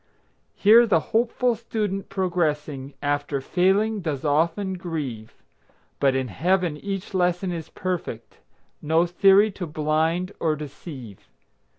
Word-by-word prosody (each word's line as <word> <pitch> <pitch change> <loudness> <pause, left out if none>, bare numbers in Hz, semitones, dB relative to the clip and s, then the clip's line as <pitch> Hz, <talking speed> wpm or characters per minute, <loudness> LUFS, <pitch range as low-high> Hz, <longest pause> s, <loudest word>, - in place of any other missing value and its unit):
Here 230 +4 +6
the 175 -7 +4
hopeful 240 +2 +2
student, 210 -4 -3
progressing, 150 -7 -2
After 145 0 -1
failing 195 +8 +1
does 155 -4 -3
often 165 +6 +1
grieve; 145 - -5 0.6
But 135 -1 +3
in 130 -2 -1
Heaven 175 - +1
each 195 +4 -5
lesson 180 0 +1
is 165 -2 -5
perfect, 175 -11 -5 0.4
No 160 +3 +2
theory 195 +4 +5
to 185 -2 -6
blind 160 +4 0
or 155 -2 +1
deceive. 140 - -10
170 Hz, 115 wpm, -24 LUFS, 150-195 Hz, 0.6 s, Here